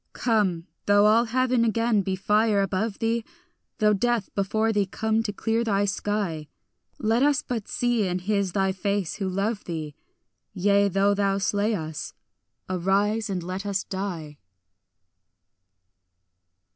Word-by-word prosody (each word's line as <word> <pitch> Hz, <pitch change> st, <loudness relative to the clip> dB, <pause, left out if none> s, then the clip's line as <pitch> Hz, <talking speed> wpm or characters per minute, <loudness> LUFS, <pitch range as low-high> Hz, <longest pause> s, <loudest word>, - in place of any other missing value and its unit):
Come, 200 Hz, -8 st, +1 dB, 0.2 s
though 205 Hz, 0 st, +5 dB
all 225 Hz, +3 st, +5 dB
heaven 250 Hz, 0 st, +1 dB
again 230 Hz, -1 st, +2 dB
be 190 Hz, 0 st, -2 dB
fire 210 Hz, +1 st, +2 dB
above 195 Hz, +2 st, -2 dB
thee; 230 Hz, 0 st, 0 dB, 0.5 s
Though 210 Hz, -2 st, +3 dB
death 235 Hz, 0 st, 0 dB
before 215 Hz, +3 st, 0 dB
thee 205 Hz, -2 st, +1 dB
come 220 Hz, +3 st, 0 dB
to 225 Hz, -2 st, -3 dB
clear 225 Hz, +3 st, -1 dB
thy 205 Hz, -3 st, +1 dB
sky; 195 Hz, -6 st, -2 dB, 0.5 s
Let 225 Hz, +2 st, +1 dB
us 285 Hz, -1 st, +3 dB
but 230 Hz, -4 st, -4 dB
see 240 Hz, -4 st, 0 dB
in 180 Hz, 0 st, -1 dB
his 195 Hz, 0 st, -1 dB
thy 195 Hz, -1 st, +1 dB
face 200 Hz, -1 st, -2 dB
who 195 Hz, -3 st, -2 dB
love 200 Hz, +3 st, -1 dB
thee; 155 Hz, -3 st, -5 dB, 0.6 s
Yea, 200 Hz, +1 st, +3 dB
though 195 Hz, +2 st, +2 dB
thou 200 Hz, -1 st, +1 dB
slay 205 Hz, +2 st, 0 dB
us, 155 Hz, -4 st, -6 dB, 0.5 s
arise 200 Hz, +4 st, 0 dB
and 185 Hz, -3 st, -2 dB
let 185 Hz, +2 st, -4 dB
us 200 Hz, -1 st, -1 dB
die. 170 Hz, -7 st, -5 dB
205 Hz, 140 wpm, -25 LUFS, 190-220 Hz, 0.6 s, though